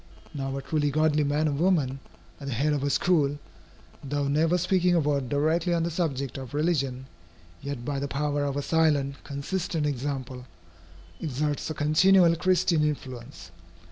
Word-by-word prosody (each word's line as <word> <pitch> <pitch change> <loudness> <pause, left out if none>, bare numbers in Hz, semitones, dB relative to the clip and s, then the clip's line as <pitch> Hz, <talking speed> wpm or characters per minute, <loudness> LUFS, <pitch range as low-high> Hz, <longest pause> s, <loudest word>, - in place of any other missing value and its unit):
Now 135 -2 -3
a 135 - -5
truly 150 -2 0
godly 155 +1 +2
man 145 +2 +1
or - - +1
woman, 145 -4 +1 0.4
at 140 - -8
the 135 - -2
head 150 +5 +1
of 145 - -1
a 140 - 0
school, 145 -3 +2 0.7
though 145 0 -1
never 160 +5 +2
speaking 180 0 +2
a - - +4
word 140 -4 0
directly 160 +4 +1
on 165 - 0
the 170 - -1
subject 140 -6 -2
of 130 +1 -8
religion, 140 -5 0 0.6
yet 140 -4 -5
by 140 0 -2
the 140 - -2
power 145 +1 -1
of 140 -1 -2
a 145 - -2
silent, 145 -4 +1
consistent 155 +3 -3
example, 130 -2 -4 0.7
exerts 150 +1 -2
a 155 - -4
continual 170 +4 +4
Christian 175 -2 +2
influence. 125 - -4
145 Hz, 165 wpm, -27 LUFS, 140-160 Hz, 0.7 s, a